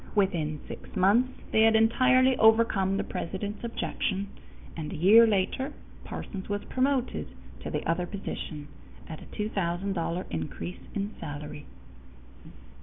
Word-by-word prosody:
Within 170 -7 +1
six - - -10
months, 220 +7 +2
they 220 - +4
had 225 0 +6
entirely 255 +3 +5
overcome 220 -4 +4
the - - 0
president's 200 +5 -5
objection, 200 -4 -2 0.5
and 155 -2 -5
a - - -5
year 215 +8 +7
later 220 +7 0 0.3
Parsons 195 -2 -6
was 205 0 -2
promoted 260 -1 0 0.3
to - - -6
the - - -3
other 175 +2 0
position 155 -6 -6 0.4
at 160 - -8
a - - -10
$2000 185 -3 -2
increase 85 +1 -5 0.2
in 205 +1 -2
salary. 145 0 -7
200 Hz, 125 wpm, -28 LUFS, 170-225 Hz, 0.5 s, year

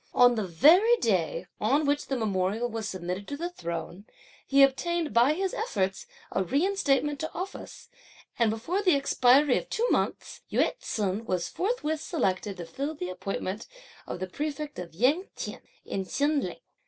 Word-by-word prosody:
On 245 0 +7
the 215 -4 -2
very 350 - +6
day 185 - 0
on 275 +8 +2
which 285 +1 0
the 270 - -1
memorial 210 +1 0
was 225 -2 -4
submitted 185 +1 -4
to 285 - -4
the 345 +3 -3
Throne, 170 - -6 0.4
he 275 0 +6
obtained 325 - +1
by 240 +6 +5
his 380 +3 -2
efforts, 195 - -2 0.2
a 190 - +1
reinstatement 285 - +1
to 315 - -3
office, 375 +6 -7 0.5
and 230 -2 +4
before 245 - -1
the 365 -6 +4
expiry 275 0 +4
of - - -12
two 470 +2 0
months, - - -1
Yü - - +2
t'sun 205 0 -2
was 180 -2 -1
forthwith 350 -7 -1
selected 195 - -1
to 175 - -6
fill 280 - -4
the 180 -10 -4
appointment 195 +2 -4 0.4
of - - -5
prefect 300 0 -4
of 170 -2 -8
Ying 280 - +2
T'ien - - -6 0.2
in 195 - -3
Chin 290 +1 +1
Ling. - - -6
255 Hz, 165 wpm, -28 LUFS, 195-310 Hz, 0.5 s, On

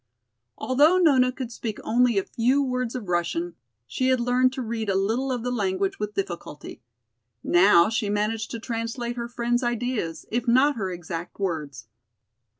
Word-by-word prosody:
Although 295 +8 +3
Nona 270 -8 +4
could 255 -2 -6
speak 225 -2 -5
only 240 -1 +2
a 195 - +2
few 245 +7 +1
words 250 -2 -2
of 235 -6 -5
Russian, 175 0 -1 0.3
she 255 - -1
had 260 -1 +3
learned 250 +1 +2
to 260 - -4
read 225 -2 -3
a 195 - +1
little 225 +8 0
of 245 -3 -2
the 250 - -2
language 195 -4 -1
with 210 0 -4
difficulty. 170 -9 -6 0.6
Now 175 -1 +5
she 220 -1 -1
managed 215 +1 -1
to 230 - -5
translate 235 +1 -4
her 235 -1 -4
friend's 240 0 -1
ideas, 240 -8 -2
if 240 +2 -1
not 265 +5 +4
her 195 -4 -3
exact 170 0 -7
words. 150 - -3
230 Hz, 165 wpm, -25 LUFS, 195-250 Hz, 0.6 s, Now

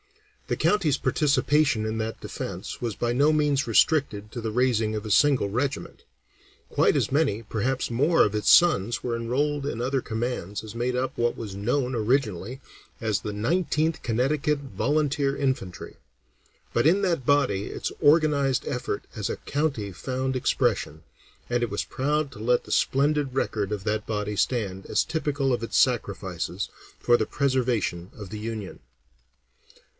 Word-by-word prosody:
The - - 0
county's 165 -9 +2
participation 145 -5 +2
in 110 0 -2
that 110 0 -3
defence - - -6
was 115 -4 -2
by 120 +3 -1
no 145 +5 +4
means 145 -3 +1
restricted 110 -4 +2
to 120 - -5
the 110 -1 -3
raising 115 -2 +1
of 105 0 -4
a 110 - -4
single 140 -2 +4
regiment. 130 +7 -3 0.7
Quite - - +3
as - - 0
many, 135 -7 +1
perhaps 120 +5 -1
more, 145 +8 +4
of 105 - -1
its 105 - +1
sons 120 - +4
were 120 -2 -2
enrolled 140 +5 -1
in 130 -5 -3
other 130 +2 0
commands 110 -4 -3
as 110 -1 -8
made 120 +2 -1
up 130 +1 -2
what 120 0 0
was 105 -4 -6
known 125 +5 0
originally 115 -1 0 0.4
as 110 -4 0
the 105 - -4
Nineteenth 155 - 0
Connecticut 140 +5 0
Volunteer 140 0 0
Infantry; 115 -11 -3 0.8
but 120 - +2
in 190 +5 +4
that 170 -9 0
body 125 -9 +2
its - - -4
organized 145 -3 +3
effort 125 -4 -3
as 105 -3 -3
a - - -3
county 140 -9 -2
found 130 +5 -3
expression, 80 - 0 0.5
and 120 0 +1
it 120 - -1
was 100 - -2
proud 150 +2 -1
to - - -12
let 120 +3 +1
the - - -9
splendid 140 -1 +1
record 105 -6 -1
of 105 -2 -3
that 105 0 -1
body 105 -1 -2
stand 100 -3 -1
as - - +2
typical 140 -4 -1
of 120 - -2
its 115 - -1
sacrifices - - 0 0.3
for 120 - +4
the 110 - 0
preservation 120 -10 0
of 105 -3 -9
the 105 - -5
Union. 110 -3 -5
125 Hz, 160 wpm, -26 LUFS, 110-145 Hz, 0.8 s, no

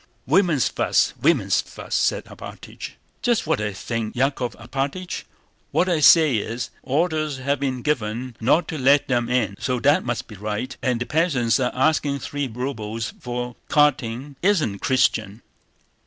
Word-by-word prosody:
"Women's 165 -2 +3
fuss, - - +1
women's - - +3
fuss!" - - -9
said - - +1
Alpátych. - - -9 0.3
"Just 240 -2 +1
what - - 0
I 105 0 -1
think, 110 +3 -4
Yákov 130 -1 0
Alpátych. 140 +9 -4 0.4
What 180 - +1
I 175 -4 +2
say 150 -4 +6
is: 115 +3 -4
orders 155 0 0
have 140 +1 -1
been 130 -3 -2
given 120 -3 -2
not 135 +9 +3
to 155 - -4
let 140 +2 +4
them 120 -2 0
in, 120 -5 0
so 125 -2 -1
that 145 +6 +4
must 120 -1 -3
be 110 - -11
right. 105 +5 -4
And 125 -2 0
the 125 - -2
peasants 140 -8 +1
are 125 -1 +1
asking 140 +1 +2
three 145 0 -3
rubles 115 -3 -4
for 125 0 -4
carting—it 140 -2 +1
isn't 160 - +1
Christian!" 110 -5 +1
130 Hz, 155 wpm, -23 LUFS, 115-150 Hz, 0.4 s, say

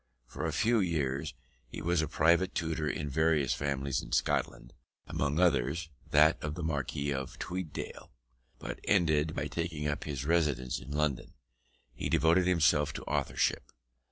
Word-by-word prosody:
For 75 +6 -4
a - - -1
few 115 +10 +2
years 75 -5 -1 0.3
he - - -7
was 85 0 +1
a 80 - -1
private 85 +4 +2
tutor 80 -2 -1
in 75 +1 -3
various 75 -1 +2
families 70 -1 -1
in - - -9
Scotland, - - 0 0.3
among 70 +3 -1
others 80 0 +2 0.2
that 75 +2 +5
of 75 0 -3
the 85 - -5
Marquis 70 -2 -2
of 65 -1 -5
Tweeddale, 90 -4 -5 0.5
but - - -6
ended 80 -2 +2
by 75 - -2
taking 75 0 -3
up 75 - -2
his 70 -3 -4
residence 75 -6 +1
in 65 - -11
London, 75 -2 -1 0.6
and - - -2
devoting 85 +4 +4
himself 80 -5 +3
to - - -6
authorship. - - -1
75 Hz, 155 wpm, -31 LUFS, 70-85 Hz, 0.6 s, that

